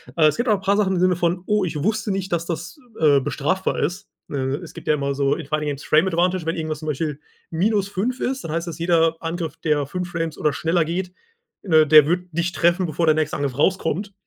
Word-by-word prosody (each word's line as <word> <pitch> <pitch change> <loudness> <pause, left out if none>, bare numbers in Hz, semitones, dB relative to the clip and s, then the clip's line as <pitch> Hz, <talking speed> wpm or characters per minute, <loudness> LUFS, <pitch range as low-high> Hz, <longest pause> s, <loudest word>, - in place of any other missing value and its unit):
Äh, 160 - +4
es 155 - +3
gibt 240 +1 0
auch 215 - +5
'n 195 - -7
paar 200 +1 +2
Sachen 195 -2 +2
im - - 0
Sinne 185 0 +3
von: 175 +1 -1
„Oh, 210 -1 +1
ich 165 - -4
wusste 220 +2 0
nicht, 190 0 -3
dass 170 -1 0
das, 170 - -5 0.2
äh, 145 -3 +5
bestrafbar 150 +8 -1
ist.“ 185 +6 -3 0.2
Äh, - - -3 0.3
es 170 - -10
gibt - - -11
ja - - +4
immer 140 -1 -1
so 140 0 +1
in 165 - -7
Fighting 150 +1 -2
against 145 -1 -4
Frame 155 +5 +4
Advantage, 180 0 +1
wenn 165 - -1
irgendwas 155 -2 -3
zum 155 - -8
Beispiel 150 0 -2 0.3
-5 200 +6 0
ist, 265 +1 -2
dann 155 - -4
heißt 170 +1 -2
es, 165 0 -8
jeder 165 -1 +2
Angriff, 165 -1 -4
der 150 -3 0
5 180 +5 -4
Frames 165 -3 -3
oder 150 - +1
schneller 165 0 +1
geht, 180 +3 -3 0.5
äh, 160 -5 +5
der 155 -1 +8
wird 180 +2 0
dich 170 +2 -1
treffen, 175 +2 +2
bevor 165 +1 -1
der 155 -1 +4
nächste 155 +2 -1
Angriff 140 -4 -2
rauskommt. 190 +4 0
170 Hz, 240 wpm, -22 LUFS, 155-185 Hz, 0.5 s, der